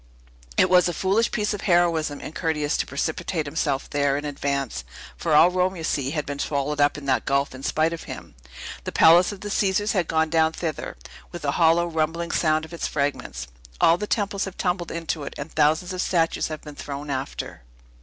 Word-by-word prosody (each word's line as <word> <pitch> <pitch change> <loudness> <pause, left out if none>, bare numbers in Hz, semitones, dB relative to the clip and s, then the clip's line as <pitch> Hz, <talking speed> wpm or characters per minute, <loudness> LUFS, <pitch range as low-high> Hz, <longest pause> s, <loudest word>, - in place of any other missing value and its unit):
It - - +5
was 180 -1 +5
a 175 - -4
foolish 200 +7 +2
piece 210 0 -1
of 205 - -5
heroism 170 -5 +2
in - - -6
Curtius 150 -3 0
to - - -1
precipitate 160 +3 -2
himself 140 -2 -1
there, 140 -1 +1
in 145 - -4
advance; 140 - -2 0.3
for 160 -3 0
all 170 +4 +7
Rome, 185 +1 +1
you 165 - -7
see, 140 -4 0
has 150 0 -2
been 140 -1 -5
swallowed 145 +1 -1
up 145 +1 +3
in 145 - -8
that 130 -1 +1
gulf, 140 0 +1
in 130 - -9
spite 155 +4 +1
of 165 - -7
him. - - -8 0.5
The - - -4
Palace 175 +4 +6
of 205 - -9
the 205 - -5
Caesars 205 +1 +1
has 185 -4 +1
gone 160 -1 +1
down 160 -1 +3
thither, 160 - -4 0.3
with 175 -3 -7
a 140 - +2
hollow, 165 +2 +4
rumbling 165 +1 -1
sound 155 -1 +2
of 160 - -13
its 170 - -2
fragments! 140 - -2 0.3
All 170 +2 +5
the 210 - -3
temples 200 -2 0
have 195 -1 -8
tumbled 180 -2 -1
into 165 -1 -3
it; - - -7
and 140 +3 -6
thousands 155 +4 +2
of 180 - -2
statues 165 -3 +1
have 155 -1 -6
been 150 - -9
thrown 145 0 -6
after! 130 - -4
160 Hz, 210 wpm, -24 LUFS, 145-175 Hz, 0.5 s, all